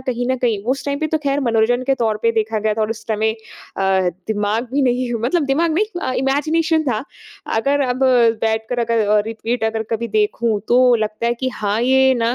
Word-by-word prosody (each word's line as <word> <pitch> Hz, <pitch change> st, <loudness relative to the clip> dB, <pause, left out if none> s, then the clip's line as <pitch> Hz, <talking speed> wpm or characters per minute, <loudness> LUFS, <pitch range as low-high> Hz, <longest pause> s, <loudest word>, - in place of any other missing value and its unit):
कहीं 245 Hz, -2 st, -3 dB
न 260 Hz, -, +1 dB
कहीं 245 Hz, -, 0 dB, 0.3 s
उस 275 Hz, +1 st, -6 dB
टाइम 280 Hz, 0 st, -2 dB
पे 310 Hz, -, -1 dB
तो 315 Hz, -, +2 dB
खैर 285 Hz, -1 st, -1 dB
मनोरंजन 235 Hz, 0 st, +1 dB
के 270 Hz, -, +2 dB
तौर 225 Hz, -4 st, 0 dB
पे 230 Hz, -, +3 dB
देखा 220 Hz, 0 st, -1 dB
गया 215 Hz, 0 st, 0 dB
था 220 Hz, -, -3 dB
और 215 Hz, -, -1 dB
उस 225 Hz, -, -4 dB
समय 220 Hz, 0 st, 0 dB
अ, 190 Hz, -4 st, -2 dB, 0.2 s
दिमाग 215 Hz, +3 st, -1 dB
भी 280 Hz, 0 st, +1 dB
नहीं 250 Hz, -1 st, 0 dB
मतलब 300 Hz, +7 st, +1 dB
दिमाग 320 Hz, +5 st, +1 dB
नहीं 420 Hz, -1 st, -1 dB
अ, 255 Hz, -, -1 dB
इमेजिनेशन 315 Hz, +5 st, +1 dB
था। 235 Hz, -4 st, -1 dB, 0.5 s
अगर 280 Hz, +5 st, +1 dB
अब 250 Hz, 0 st, -2 dB, 0.4 s
बैठ 220 Hz, 0 st, 0 dB
कर 245 Hz, -, -2 dB
अगर 230 Hz, -2 st, +1 dB
अ, 210 Hz, 0 st, +4 dB
रिपीट 225 Hz, +1 st, -3 dB
अगर 220 Hz, 0 st, -1 dB
कभी 230 Hz, +1 st, -2 dB
देखूँ, 215 Hz, +1 st, 0 dB
तो 250 Hz, 0 st, +5 dB
लगता 215 Hz, 0 st, -2 dB
है 235 Hz, -, +1 dB
कि 260 Hz, -, 0 dB
हाँ, 210 Hz, +1 st, -1 dB
ये 265 Hz, +1 st, +4 dB
ना 235 Hz, 0 st, 0 dB
235 Hz, 220 wpm, -19 LUFS, 220-265 Hz, 0.5 s, तो